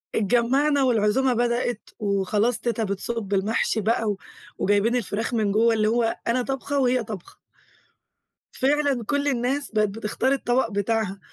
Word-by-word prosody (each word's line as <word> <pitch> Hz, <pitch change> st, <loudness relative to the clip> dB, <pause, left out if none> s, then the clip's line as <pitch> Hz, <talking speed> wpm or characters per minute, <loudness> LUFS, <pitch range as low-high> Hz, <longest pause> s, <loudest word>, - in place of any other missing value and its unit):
اتجمّعنا 260 Hz, +7 st, +2 dB
والعزومة 245 Hz, +2 st, +2 dB
بدأت، 240 Hz, -1 st, -1 dB
وخلاص 210 Hz, +3 st, 0 dB
تيتا 235 Hz, -1 st, -1 dB
بتصُب 205 Hz, +1 st, -3 dB
المحشي 215 Hz, +2 st, +1 dB
بقى 225 Hz, +2 st, +1 dB
و 200 Hz, -, -2 dB, 0.4 s
وجايبين 205 Hz, +4 st, +2 dB
الفراخ 225 Hz, 0 st, -2 dB
من 215 Hz, -3 st, +1 dB
جوا 225 Hz, +2 st, +3 dB
اللي 215 Hz, -1 st, +1 dB
هو 230 Hz, 0 st, +1 dB
أنا 250 Hz, +2 st, +2 dB
طابخة 270 Hz, +2 st, -2 dB
وهي 250 Hz, -2 st, +2 dB
طابخة. 205 Hz, -5 st, -9 dB, 1.2 s
فعلًا 280 Hz, -2 st, +1 dB
كُلّ 285 Hz, +2 st, 0 dB
الناس 265 Hz, +2 st, -1 dB
بقت 215 Hz, -1 st, +2 dB
بتختار 225 Hz, +5 st, -2 dB
الطبق 245 Hz, -3 st, 0 dB
بتاعها، 205 Hz, -1 st, -1 dB
230 Hz, 140 wpm, -24 LUFS, 210-255 Hz, 1.2 s, جوا